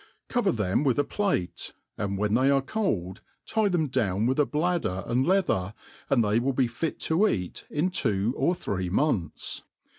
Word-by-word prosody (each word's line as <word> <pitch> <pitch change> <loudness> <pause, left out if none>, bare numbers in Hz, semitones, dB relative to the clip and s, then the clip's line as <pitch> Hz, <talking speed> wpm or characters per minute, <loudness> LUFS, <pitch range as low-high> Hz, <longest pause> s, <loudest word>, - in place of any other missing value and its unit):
Cover 245 -6 +2
them 105 - 0
with 130 -5 +2
a 145 - +3
plate, 190 - -2 0.2
and 100 -1 -2
whfen 105 +1 0
they 130 +4 +4
arc 135 -1 +2
cold, 100 - -2 0.2
tie 220 -2 +1
them 170 -4 +1
down 110 -6 0
with 130 +4 +1
a 150 - +4
bladder 155 - -1
and 125 +4 +1
leather, 110 - +1 0.3
and 125 -4 +4
they 105 +2 +2
will 135 +3 0
be 130 0 +2
fit 120 +7 -3
to 175 +7 +3
eat 90 - -3
in 160 +5 0
two 110 - 0
or 175 - +1
three 95 - -3
months. 100 - -1
130 Hz, 180 wpm, -27 LUFS, 100-165 Hz, 0.3 s, they